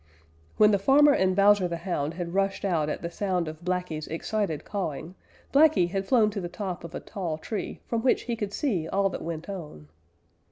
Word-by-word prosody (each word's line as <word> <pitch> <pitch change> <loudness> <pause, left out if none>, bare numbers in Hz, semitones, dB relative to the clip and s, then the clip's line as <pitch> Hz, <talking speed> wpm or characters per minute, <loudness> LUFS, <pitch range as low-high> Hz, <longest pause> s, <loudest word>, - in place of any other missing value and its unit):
When 210 0 +6
the 200 - +3
farmer 285 +7 +6
and 190 -8 +2
Bowser 200 -1 +5
the 170 -1 -3
Hound 165 -3 -3
had 175 -1 -5
rushed 195 +1 0
out 160 -6 +1
at - - -4
the 170 - -3
sound 180 -3 -1
of 155 +1 -7
Blacky's 180 -4 -2
excited 165 0 -2
cawing, 175 -4 -4 0.4
Blacky 285 - +5
had 195 0 -2
flown 225 -5 +4
to 200 -1 -4
the 175 - -4
top 185 -1 -5
of 170 0 -8
a - - -3
tall 175 -6 -4
tree 205 +7 -5
from 230 -1 -1
which 255 - +2
he 235 - -2
could 210 -3 -4
see 200 - -1
all 195 +3 +1
that - - -5
went 165 -1 -5
on. 150 - -8
185 Hz, 205 wpm, -27 LUFS, 170-205 Hz, 0.4 s, When